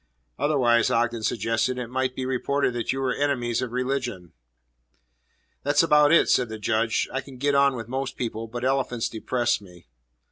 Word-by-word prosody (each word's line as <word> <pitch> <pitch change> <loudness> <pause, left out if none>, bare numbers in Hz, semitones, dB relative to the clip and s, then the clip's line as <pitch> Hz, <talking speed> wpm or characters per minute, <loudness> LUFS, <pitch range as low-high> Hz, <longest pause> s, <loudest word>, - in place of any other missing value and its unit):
"Otherwise," 125 -5 +3
Ogden 120 0 0
suggested, 115 +3 0
"it 125 - -3
might 130 +1 -2
be 130 - -3
reported 130 +1 0
that 120 -1 -2
you 135 - -3
were 130 -2 0
enemies 125 -5 0
of 125 -2 -4
religion." 125 -8 -3 1.3
"That's 145 +2 +3
about 150 -2 +5
it," 170 - +5
said 125 -3 +2
the 110 - -6
Judge. 110 +1 0
"I 135 - -1
can 135 -1 -13
get 145 +3 +1
on 140 -1 +4
with 115 -3 -6
most 130 +1 -4
people. 115 -2 -4
But 120 +2 -5
elephants 125 -3 0
depress 120 +1 -1
me." 90 -3 -16
125 Hz, 175 wpm, -25 LUFS, 115-135 Hz, 1.3 s, about